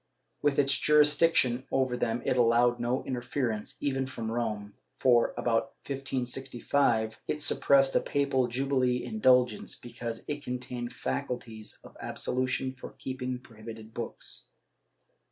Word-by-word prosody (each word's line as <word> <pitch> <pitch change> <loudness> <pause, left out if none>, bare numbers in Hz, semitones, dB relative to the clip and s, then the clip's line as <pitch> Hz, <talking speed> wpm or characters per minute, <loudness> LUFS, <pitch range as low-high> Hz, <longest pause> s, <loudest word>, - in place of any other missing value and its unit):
With 145 -1 +2
its 140 -1 +4
jurisdiction 150 -4 +4
over 130 -2 +1
them 115 -1 -1
it - - +2
allowed 120 0 +4
no 120 +2 0
interference, 125 -3 -3
even 135 -2 -1
from 115 -3 -4
Rome, 105 -3 -2 0.2
for, 120 -2 +4
about 120 +3 0
1565, 130 -3 0
it 150 0 -2
suppressed 135 -1 +4
a - - +6
papal 140 -3 +1
jubilee 125 0 +1
indulgence, 125 - +2
because 120 -1 -6
it 145 -1 -4
contained 125 -1 -4
faculties 120 -4 -4
of - - -14
absolution 130 +1 -1
for 125 - -10
keeping 130 -1 -4
prohibited 110 -2 -11
books. 115 0 -5
125 Hz, 120 wpm, -29 LUFS, 120-135 Hz, 0.2 s, a